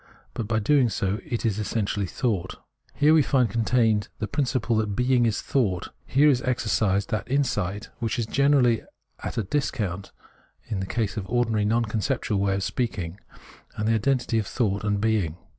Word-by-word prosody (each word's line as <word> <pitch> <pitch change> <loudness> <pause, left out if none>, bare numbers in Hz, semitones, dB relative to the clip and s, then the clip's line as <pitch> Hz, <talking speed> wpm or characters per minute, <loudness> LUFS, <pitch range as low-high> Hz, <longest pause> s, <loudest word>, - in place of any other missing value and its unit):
But 110 - -4
by 110 0 0
doing 125 +3 +3
so 100 0 -1
it 120 - -3
is 110 -2 0
essentially 105 -2 -1
Thought. 95 -4 -2
Preface - - -19 0.3
53 - - -25
Here 155 - +7
we 160 - +6
find 130 -5 +2
contained 115 -2 +2
the 105 - -3
principle 130 -4 0
that 105 -2 -1
Being 125 0 +3
is 110 - -1
Thought: 100 -10 0 0.2
here 145 +3 +4
is 130 -4 +4
exercised 110 -5 0
that 110 - -2
insight 110 -7 -1
which 115 0 -1
is 115 - 0
generally 135 -2 +3 0.4
at - - -6
a 115 - +1
discount 100 -6 -2 0.5
in 100 - -3
the 95 - -3
case 110 0 -2
of 100 - -3
the - - -15
ordinary 115 -3 +1
non 115 +2 +2
conceptual 110 -1 -1
way 100 0 +1
of 100 - -2
speaking 95 -6 -3 0.6
of 105 - -1
the 115 - +3
identity 120 0 +1
of 105 - -3
thought 105 -5 -1
and 105 -1 0
being. 100 -7 0
110 Hz, 190 wpm, -25 LUFS, 100-125 Hz, 0.6 s, Here